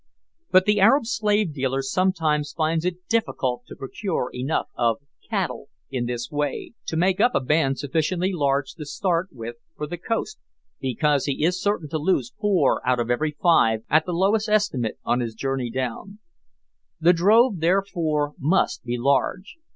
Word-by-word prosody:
But 185 0 +5
the 210 0 +3
Arab 230 +7 +5
slave 210 -6 +1
dealer 135 -1 -1
sometimes 155 -2 0
finds 160 +1 0
it 180 0 -4
difficult 130 - -1
to - - -10
procure 135 0 -3
enough 130 +5 -2
of 115 -2 +1 0.3
"cattle" - - -2 0.2
in 125 -3 -2
this 120 0 -4
way 145 +6 -3
to 160 - -2
make 185 +2 +2
up 245 - +3
a - - +4
band 135 0 +1
sufficiently 165 +6 -1
large 140 -4 0
to 155 -3 -8
start 170 +4 0
with 115 -1 -8 0.2
for 150 - -3
the 170 +3 -6
coast 230 - -3 0.4
because 135 +2 +1
he 140 +1 -1
is 180 +1 0
certain 200 -6 0
to 155 +1 -2
lose 145 -7 0
four 195 -9 +2
out 125 +1 +1
of 120 0 -1
every 150 +4 -1
five, 115 -11 +4
at 155 +3 +4
the - - -1
lowest 205 +5 +1
estimate, 140 - +1
on 120 - +1
his 115 -2 -3
journey 135 0 -2
down. 130 - -4 0.8
The 170 +2 +5
drove, 205 +4 +4
therefore, 165 -4 0
must 165 +8 +1
be 120 0 -2
large. 140 - 0
155 Hz, 165 wpm, -24 LUFS, 135-185 Hz, 0.8 s, But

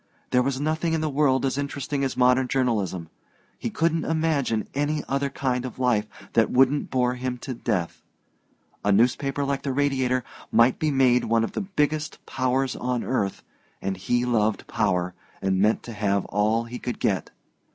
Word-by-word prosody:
There 125 - +4
was 130 +1 -1
nothing 160 +3 0
in 160 - +1
the 155 -1 -1
world 135 -2 +2
as 135 +1 0
interesting 140 0 -2
as 135 - -2
modern 125 +1 +4
journalism. 105 -11 -1 0.5
He - - -2
couldn't 165 0 +1
imagine 155 -8 0
any 145 +2 0
other 140 +1 0
kind 130 -2 -1
of 130 -3 -6
life 120 -5 +1 0.3
that 115 - +4
wouldn't 135 +3 +3
bore 125 -1 +1
him 125 0 -3
to 130 +1 -5
death. 105 -8 -2 0.8
A 105 - +2
newspaper 135 +6 +2
like 140 0 -1
the 140 - -2
Radiator 130 -2 +1 0.3
might 120 +2 +4
be 155 - +1
made 130 -3 +3
one 115 0 +2
of 115 - -2
the - - -3
biggest 155 -6 -1
powers 130 0 0
on 125 -1 -2
earth, 100 -7 -1 0.4
and 95 0 -2
he 120 +6 0
loved 110 -4 +1
power, 90 -5 0 0.3
and 95 -1 +1
meant 105 +2 +2
to 120 - -7
have 100 -2 0
all 110 +3 +1
he 120 +1 -7
could 125 -2 -4
get. - - 0
125 Hz, 175 wpm, -25 LUFS, 115-140 Hz, 0.8 s, There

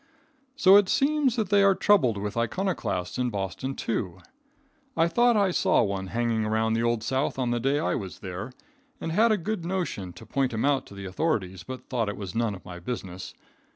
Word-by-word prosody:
So 200 -7 +7
it 205 -2 +3
seems 280 -3 +2
that 220 -5 -1
they 200 -1 +5
are 195 -1 +5
troubled 140 - +3
with 105 0 -4
iconoclasts 120 - -2
in 125 -1 +1
Boston, 105 +6 -4
too. 95 -6 -3 0.8
I 165 0 +4
thought 235 +6 +3
I 200 -2 +3
saw - - +3
one 100 -2 -2
hanging 115 +1 0
around 110 +1 +1
the 115 - +1
Old 120 -1 0
South 135 +4 -1
on 125 -2 0
the 120 - 0
day 135 +4 +1
I 150 - 0
was 95 -8 -5
there, 95 +6 -6 0.5
and 165 - -4
had 220 +7 +4
a 215 - +3
good 200 0 -3
notion 170 - -3
to - - -12
point 135 -3 -1
him 110 - 0
out 140 -2 +1
to 100 - -12
the 100 0 -7
authorities, 95 - -1
but 130 +8 -8
thought 115 -4 -1
it 105 - -5
was 95 -3 -6
none 115 -3 0
of 95 - -14
my 90 -1 -8
business. 95 -3 -6
120 Hz, 210 wpm, -26 LUFS, -, 0.8 s, So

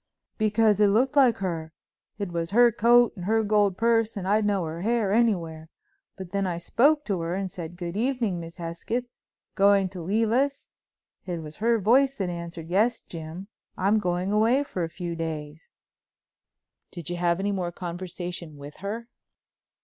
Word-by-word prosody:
"Because 215 -1 +3
it 210 - +6
looked 250 +8 +2
like 260 -5 +5
her. 165 -4 -4 0.4
It 200 -4 -4
was 165 -1 -2
her 240 +3 +5
coat 240 +2 +4
and 180 -3 -7
her 220 +2 +2
gold 205 -3 +2
purse 225 -1 +2
and 185 -1 -4
I'd 210 +1 +2
know 195 -4 0
her 160 +2 -5
hair 220 -1 +1
anywhere. 170 -9 0 0.5
And 190 -2 -7
when 200 -1 0
I 175 -2 -2
spoke 285 - +2
to 195 -4 -1
her 165 +2 -2
and 190 -1 -3
said: 170 -1 -7
'Good 175 0 -5
evening, 230 -5 0
Miss 165 0 -9
Hesketh, 175 +8 -3 0.5
going 200 -1 +4
to 180 -1 -8
leave 215 +6 0
us?' 275 +3 0 0.6
it 170 -3 -4
was 150 0 -9
her 230 +2 +2
voice 260 +7 +3
that 195 -6 -2
answered: 170 -1 -7
'Yes, 225 +5 +2
Jim, 165 +3 -8 0.3
I'm 200 +3 +2
going 180 0 -1
away 225 +6 +3
for 185 -10 -4
a 165 - -3
few 170 0 -5
days.'" 155 -1 -6 1.2
"Did 175 -2 -7
you 175 - -3
have 175 0 +1
any 200 +1 0
more 180 -3 -2
conversation 175 -2 -6
with 145 +1 -10
her?" 220 +4 -5
195 Hz, 175 wpm, -26 LUFS, 170-225 Hz, 1.2 s, it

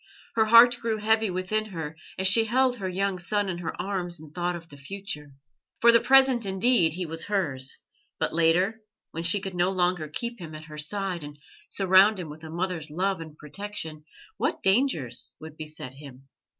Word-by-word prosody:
Her 220 -1 +3
heart 235 +2 +7
grew 225 -2 -1
heavy 220 0 +2
within 185 +4 -1
her 160 -6 -6 0.2
as 190 - +3
she 225 +4 +5
held 250 +2 +2
her 190 -4 -3
young 190 0 -1
son 205 +2 -1
in 175 -2 -3
her 175 - -5
arms 175 -3 -2
and 155 -1 -13
thought 175 0 -1
of 170 -1 -9
the 145 - -13
future. 150 -2 -7 0.4
For 235 - +7
the 235 - +6
present 265 -1 +5
indeed 190 -3 +3
he 180 +1 -3
was 165 0 -5
hers; 140 -10 -2 0.4
but - - -1
later, 175 +7 +2 0.3
when 165 - -4
she 170 +4 +2
could 190 -1 -6
no 175 +1 +2
longer 180 -3 0
keep 235 +10 -5
him 160 -3 -8
at 155 0 -9
her 150 -1 -10
side 185 +1 -3
and 145 0 -9 0.3
surround 195 +2 +5
him 170 -4 -6
with 155 +2 -11
a 160 - -8
mother's 170 -2 -3
love 185 +4 -1
and 155 -2 -10
protection, 160 -1 -5 0.3
what - - -1
dangers 190 - 0
would 160 -1 -10
beset 155 -4 -7
him? 135 -1 -13
180 Hz, 190 wpm, -26 LUFS, 155-205 Hz, 0.4 s, heart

